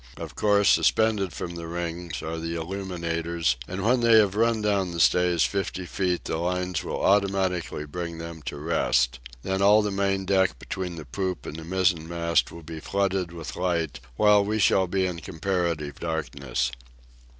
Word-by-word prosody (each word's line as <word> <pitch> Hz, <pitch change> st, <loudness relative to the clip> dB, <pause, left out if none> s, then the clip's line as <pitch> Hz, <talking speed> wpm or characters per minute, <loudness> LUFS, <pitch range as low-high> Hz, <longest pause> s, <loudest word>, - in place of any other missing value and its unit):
Of 80 Hz, -1 st, -7 dB
course, 105 Hz, -1 st, +3 dB
suspended 105 Hz, -4 st, +3 dB
from 85 Hz, -, -5 dB
the 85 Hz, -1 st, -6 dB
rings, 85 Hz, -3 st, -4 dB
are 80 Hz, +1 st, -4 dB
the 85 Hz, +1 st, -4 dB
illuminators, 85 Hz, -4 st, -2 dB
and 95 Hz, +1 st, -4 dB
when 125 Hz, +3 st, +3 dB
they 115 Hz, -1 st, +5 dB
have 105 Hz, -3 st, +4 dB
run 115 Hz, +1 st, +2 dB
down 100 Hz, -4 st, +1 dB
the 85 Hz, -, -4 dB
stays 90 Hz, -1 st, +4 dB
fifty 95 Hz, -2 st, -2 dB
feet 90 Hz, -1 st, -1 dB
the -, -, -2 dB
lines 90 Hz, 0 st, -1 dB
will -, -, -4 dB
automatically 95 Hz, -5 st, +1 dB
bring 85 Hz, +2 st, -5 dB
them 85 Hz, -1 st, -7 dB
to -, -, -4 dB
rest. 65 Hz, -6 st, +1 dB, 0.2 s
Then 95 Hz, 0 st, -1 dB
all 105 Hz, +2 st, +6 dB
the 105 Hz, -, -1 dB
main 95 Hz, -1 st, 0 dB
deck 95 Hz, -7 st, +2 dB
between 90 Hz, +6 st, -5 dB
the 80 Hz, -2 st, -8 dB
poop 95 Hz, +8 st, -3 dB
and -, -, -6 dB
the 80 Hz, -, -7 dB
mizzen 90 Hz, -2 st, +1 dB
mast 85 Hz, -1 st, +1 dB
will 85 Hz, -, -10 dB
be 80 Hz, +1 st, -7 dB
flooded 95 Hz, 0 st, -1 dB
with 80 Hz, -3 st, -7 dB
light, 85 Hz, -5 st, -1 dB, 0.2 s
while 105 Hz, -, +5 dB
we 105 Hz, +2 st, -1 dB
shall 95 Hz, -2 st, +3 dB
be 95 Hz, +1 st, 0 dB
in 90 Hz, -2 st, -3 dB
comparative 85 Hz, -4 st, -2 dB
darkness. 70 Hz, -6 st, -2 dB
90 Hz, 175 wpm, -26 LUFS, 85-95 Hz, 0.2 s, all